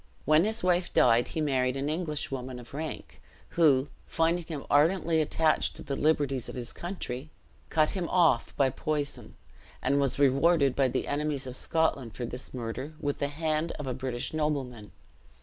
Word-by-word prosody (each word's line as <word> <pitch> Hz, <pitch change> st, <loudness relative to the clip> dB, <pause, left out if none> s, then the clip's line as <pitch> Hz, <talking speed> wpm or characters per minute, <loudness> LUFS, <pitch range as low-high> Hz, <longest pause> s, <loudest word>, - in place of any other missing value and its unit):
When 155 Hz, +4 st, +5 dB
his 220 Hz, -1 st, -1 dB
wife 180 Hz, -1 st, +2 dB
died 120 Hz, 0 st, +5 dB
he 160 Hz, -, -3 dB
married 130 Hz, -3 st, +1 dB
an 135 Hz, +1 st, -2 dB
Englishwoman 145 Hz, -6 st, -3 dB
of 120 Hz, +1 st, -12 dB
rank, 155 Hz, +2 st, -6 dB, 0.3 s
who, 145 Hz, -5 st, +4 dB, 0.2 s
finding 165 Hz, +1 st, +1 dB
him 155 Hz, -4 st, -6 dB
ardently 160 Hz, +2 st, +3 dB
attached 155 Hz, +1 st, +1 dB
to -, -, -9 dB
the 140 Hz, -, -3 dB
liberties 145 Hz, -4 st, +1 dB
of -, -, -7 dB
his 120 Hz, -1 st, -5 dB
country, 155 Hz, -6 st, -5 dB, 0.4 s
cut 155 Hz, -1 st, +2 dB
him 180 Hz, -4 st, -3 dB
off 170 Hz, -9 st, +2 dB
by 135 Hz, -2 st, +3 dB
poison, 145 Hz, +1 st, -3 dB, 0.4 s
and 140 Hz, +2 st, +1 dB
was 140 Hz, -2 st, +1 dB
rewarded 140 Hz, +1 st, +4 dB
by 135 Hz, -1 st, +3 dB
the 125 Hz, -, -2 dB
enemies 145 Hz, -1 st, -1 dB
of 130 Hz, -1 st, -6 dB
Scotland 140 Hz, -8 st, 0 dB
for 120 Hz, -, -3 dB
this 125 Hz, +2 st, -6 dB
murder 125 Hz, +4 st, -5 dB
with 145 Hz, 0 st, -2 dB
the 140 Hz, -, 0 dB
hand 155 Hz, +2 st, -1 dB
of 150 Hz, -, -7 dB
a 130 Hz, -, -2 dB
British 130 Hz, 0 st, -4 dB
nobleman. 135 Hz, -8 st, -2 dB
145 Hz, 170 wpm, -29 LUFS, 130-160 Hz, 0.4 s, When